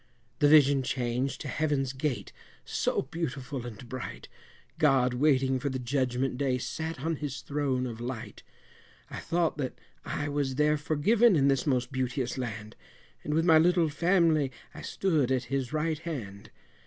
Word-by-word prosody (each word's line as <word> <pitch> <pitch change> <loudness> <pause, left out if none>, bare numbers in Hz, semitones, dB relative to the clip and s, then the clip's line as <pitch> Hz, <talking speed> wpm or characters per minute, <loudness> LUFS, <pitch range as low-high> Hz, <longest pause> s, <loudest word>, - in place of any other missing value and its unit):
The 145 - +5
vision 145 -2 +6
changed 125 +1 -2
to 145 - -5
Heaven's 140 -2 0
gate, 130 -7 -3 0.3
so - - 0
beautiful 135 -4 -4
and 120 +1 -9
bright, 130 +1 -7 0.5
God 135 -4 +4
waiting 135 -1 +2
for 140 +2 -2
the 130 - -3
Judgment 125 0 -1
Day 135 -3 +1
sat 160 +3 -4
on 165 +1 -1
his 140 -2 -5
Throne 140 -3 -1
of 115 -2 -6
Light; 120 -4 -6 0.7
I - - -5
thought 170 -2 0
that 130 -3 -3 0.3
I 145 - -3
was 145 -2 -1
there 150 +1 +2
forgiven 190 +9 +3
in 140 -2 +4
this 135 +1 +1
most 125 -1 +1
beauteous 130 -1 -2
land, 110 -4 -5 0.5
And 150 - -1
with 165 +1 +2
my 160 -2 +7
little 170 -1 +3
family 165 -3 +2 0.2
I - - -9
stood 155 -9 0
at 130 -1 +1
His 135 -3 -1
right 155 0 -1
hand. 115 -13 -6
135 Hz, 160 wpm, -29 LUFS, 125-155 Hz, 0.7 s, my